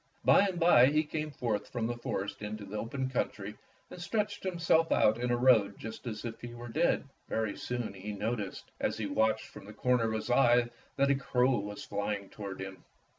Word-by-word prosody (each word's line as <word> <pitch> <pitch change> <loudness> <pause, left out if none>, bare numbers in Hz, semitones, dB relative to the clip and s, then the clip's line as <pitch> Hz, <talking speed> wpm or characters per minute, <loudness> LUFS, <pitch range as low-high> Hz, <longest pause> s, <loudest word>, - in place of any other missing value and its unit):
By 200 - +6
and 180 -3 -3
by 165 -8 +7
he 150 +2 +3
came 155 0 -3
forth 110 -7 -2
from 120 -3 -2
the 120 +1 -1
forest 100 -4 -4
into 105 0 -5
the 100 +2 -8
open 130 +3 -3
country 105 -5 -3 0.4
and 180 - -9
stretched 210 +2 -2
himself 165 -3 +2
out 110 +2 +4
in 125 0 -1
a 120 - +2
road 115 -5 +4
just 110 +2 -8
as 110 0 -5
if 115 -1 -6
he 120 0 -7
were 120 0 -8
dead. 155 +2 +1 0.2
Very'^soon 110 +1 -2
he 100 +2 -6
noticed, 105 -1 -4
as 105 - -1
he 110 - -2
watched 110 +2 +1
from - - -12
the 105 - -10
corner 125 +1 +2
of 110 - 0
his 110 +2 -2
eye, 120 -1 +4 0.2
that 140 0 +3
a - - +4
crow 125 -2 +2
was 105 0 -6
flying 100 -1 -3
toward 100 -3 -7
him. 95 -1 -7
120 Hz, 205 wpm, -31 LUFS, 105-130 Hz, 0.4 s, by